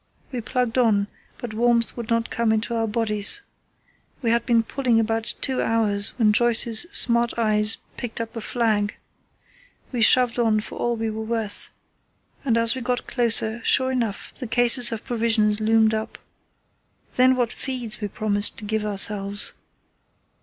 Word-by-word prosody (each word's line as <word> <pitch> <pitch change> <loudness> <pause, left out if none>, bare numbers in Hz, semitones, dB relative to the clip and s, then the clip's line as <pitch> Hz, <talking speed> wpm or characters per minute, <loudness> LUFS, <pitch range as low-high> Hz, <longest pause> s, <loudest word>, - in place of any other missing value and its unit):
We 250 -3 -4
plugged 250 0 -1
on, 205 -4 +2 0.3
but 240 -4 -7
warmth 235 +1 +1
would 235 -2 -7
not 230 0 -1
come 235 -1 0
into 220 +2 -1
our 225 -1 -1
bodies. 215 - -1 0.8
We 230 - +1
had 235 0 0
been 230 -2 +3
pulling 245 -1 0
about 225 0 -1
two 265 -2 0
hours 210 -3 0
when 215 -4 +3
Joyce's 235 +3 +3
smart 235 -8 +2
eyes 215 -1 +3 0.2
picked 235 -2 -5
up 230 +1 -6
a 230 - -5
flag. 215 -3 -1 0.9
We 245 -3 -3
shoved 245 +1 +5
on 220 -2 +2
for 210 - -8
all 240 0 0
we 225 -1 -3
were 220 +1 -5
worth, 220 -2 -1 0.7
and 235 -4 +1
as 230 0 +4
we 260 - -6
got 245 +1 -2
closer, 230 -2 0
sure 260 -1 +3
enough, 230 -6 -3
the 250 - -5
cases 240 +1 +5
of 225 -1 -5
provisions 220 -3 +1
loomed 220 0 +3
up. 220 0 -4 1.0
Then 255 +1 +4
what 245 -2 -1
feeds 245 -5 -3
we 205 - -2
promised 205 0 -2
to 210 - -7
give 215 0 -2
ourselves. 200 0 -3
230 Hz, 160 wpm, -23 LUFS, 215-240 Hz, 1.0 s, shoved